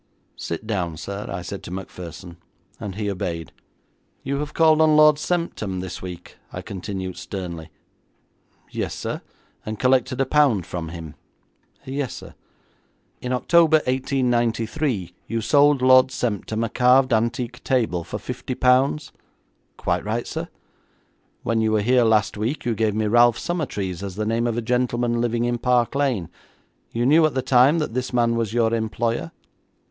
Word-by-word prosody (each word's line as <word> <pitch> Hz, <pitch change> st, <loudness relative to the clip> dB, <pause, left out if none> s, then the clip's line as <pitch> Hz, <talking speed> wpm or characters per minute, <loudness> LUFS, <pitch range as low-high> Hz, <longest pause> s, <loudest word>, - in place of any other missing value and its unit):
'Sit 85 Hz, +6 st, -5 dB
down, 90 Hz, -7 st, -2 dB
sir,' 100 Hz, +5 st, -6 dB
I 85 Hz, -, -4 dB
said 100 Hz, +2 st, -6 dB
to -, -, -9 dB
Macpherson, 90 Hz, -2 st, -8 dB, 0.4 s
and 95 Hz, -2 st, -6 dB
he 105 Hz, 0 st, -3 dB
obeyed. 85 Hz, -4 st, -4 dB, 0.7 s
'You 140 Hz, +1 st, -2 dB
have 150 Hz, +1 st, -5 dB
called 160 Hz, -1 st, +5 dB
on 155 Hz, -1 st, +5 dB
Lord 150 Hz, -1 st, +6 dB
Semptam 155 Hz, -, -2 dB
this 90 Hz, -1 st, -6 dB
week,' 90 Hz, -1 st, -9 dB
I -, -, -6 dB
continued 95 Hz, -1 st, -5 dB
sternly. 85 Hz, -2 st, -6 dB, 1.0 s
'Yes, -, -, -3 dB
sir.' -, -, -4 dB, 0.4 s
'And 110 Hz, 0 st, -5 dB
collected 130 Hz, +1 st, +2 dB
a 135 Hz, -, +3 dB
pound 130 Hz, -, +3 dB
from 85 Hz, -2 st, -5 dB
him?' 80 Hz, -2 st, -8 dB, 0.7 s
'Yes, 135 Hz, -1 st, -3 dB
sir.' -, -, -10 dB, 0.9 s
'In 125 Hz, -, -4 dB
October, 160 Hz, +5 st, +4 dB
1893, 120 Hz, -, 0 dB
you 115 Hz, +1 st, -2 dB
sold 140 Hz, +4 st, +4 dB
Lord 130 Hz, 0 st, +7 dB
Semptam 110 Hz, -3 st, -2 dB
a -, -, -4 dB
carved 130 Hz, +1 st, +4 dB
antique 120 Hz, +2 st, -1 dB
table 110 Hz, -10 st, 0 dB
for -, -, -5 dB
fifty 130 Hz, -, -5 dB
pounds?' 130 Hz, +4 st, +2 dB, 0.7 s
'Quite -, -, -1 dB
right, 110 Hz, +3 st, -2 dB
sir.' -, -, -5 dB, 1.0 s
'When 115 Hz, -1 st, +1 dB
you 110 Hz, 0 st, +1 dB
were 105 Hz, -1 st, +2 dB
here 125 Hz, +3 st, +4 dB
last 110 Hz, -2 st, +2 dB
week 115 Hz, +8 st, -2 dB
you 120 Hz, -, +1 dB
gave 110 Hz, -1 st, 0 dB
me 110 Hz, 0 st, 0 dB
Ralph 120 Hz, +2 st, +5 dB
Summertrees 105 Hz, -, -3 dB
as 100 Hz, -2 st, -6 dB
the 110 Hz, +1 st, -2 dB
name 115 Hz, +2 st, 0 dB
of 115 Hz, -1 st, -1 dB
a 120 Hz, -, -1 dB
gentleman 120 Hz, 0 st, 0 dB
living 120 Hz, 0 st, 0 dB
in 120 Hz, 0 st, -1 dB
Park 125 Hz, -1 st, +2 dB
Lane. 135 Hz, -, 0 dB, 0.6 s
You 120 Hz, +1 st, -1 dB
knew 155 Hz, +5 st, +5 dB
at 145 Hz, -, -6 dB
the 130 Hz, -, 0 dB
time 130 Hz, +5 st, +5 dB
that 150 Hz, -8 st, -2 dB
this 125 Hz, +1 st, -2 dB
man 120 Hz, -1 st, +2 dB
was 115 Hz, -3 st, -1 dB
your 115 Hz, -1 st, +2 dB
employer?' 115 Hz, -4 st, -1 dB
115 Hz, 160 wpm, -23 LUFS, 100-130 Hz, 1.0 s, Lord